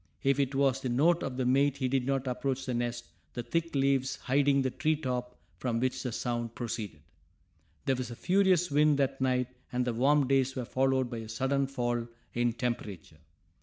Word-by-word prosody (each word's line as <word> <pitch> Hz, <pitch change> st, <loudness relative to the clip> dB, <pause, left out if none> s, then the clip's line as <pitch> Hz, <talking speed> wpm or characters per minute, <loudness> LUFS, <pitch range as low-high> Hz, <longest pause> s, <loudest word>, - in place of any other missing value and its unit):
If 140 Hz, 0 st, +2 dB
it 135 Hz, -1 st, 0 dB
was 135 Hz, -1 st, +2 dB
the 130 Hz, -, -2 dB
note 165 Hz, +8 st, +3 dB
of 130 Hz, -1 st, -4 dB
the 130 Hz, -, 0 dB
mate 140 Hz, +2 st, +3 dB
he 130 Hz, -2 st, 0 dB
did 130 Hz, -1 st, 0 dB
not 135 Hz, -1 st, 0 dB
approach 130 Hz, +1 st, -2 dB
the 125 Hz, -, -2 dB
nest, 120 Hz, 0 st, -2 dB, 0.3 s
the 120 Hz, -, -3 dB
thick 165 Hz, +4 st, -2 dB
leaves 135 Hz, -1 st, +2 dB
hiding 140 Hz, +1 st, +2 dB
the 130 Hz, -, 0 dB
tree 155 Hz, +5 st, +1 dB
top 125 Hz, -4 st, -4 dB, 0.2 s
from 120 Hz, -3 st, -1 dB
which 130 Hz, +1 st, -1 dB
the 125 Hz, -, -3 dB
sound 120 Hz, -1 st, -3 dB
proceeded. 110 Hz, -, -5 dB, 0.8 s
There 135 Hz, -, +2 dB
was 125 Hz, -1 st, -4 dB
a 120 Hz, -, -7 dB
furious 185 Hz, 0 st, +2 dB
wind 150 Hz, 0 st, +4 dB
that 135 Hz, -1 st, 0 dB
night 125 Hz, -1 st, +1 dB, 0.2 s
and 125 Hz, 0 st, 0 dB
the 120 Hz, -, -1 dB
warm 140 Hz, +4 st, +3 dB
days 135 Hz, -1 st, +2 dB
were 125 Hz, -2 st, -3 dB
followed 130 Hz, +1 st, +1 dB
by 115 Hz, -, -4 dB
a 110 Hz, -1 st, -8 dB
sudden 135 Hz, +4 st, 0 dB
fall 120 Hz, -3 st, -2 dB, 0.3 s
in 120 Hz, -1 st, +1 dB
temperature. 115 Hz, -6 st, -4 dB
130 Hz, 200 wpm, -30 LUFS, 120-140 Hz, 0.8 s, wind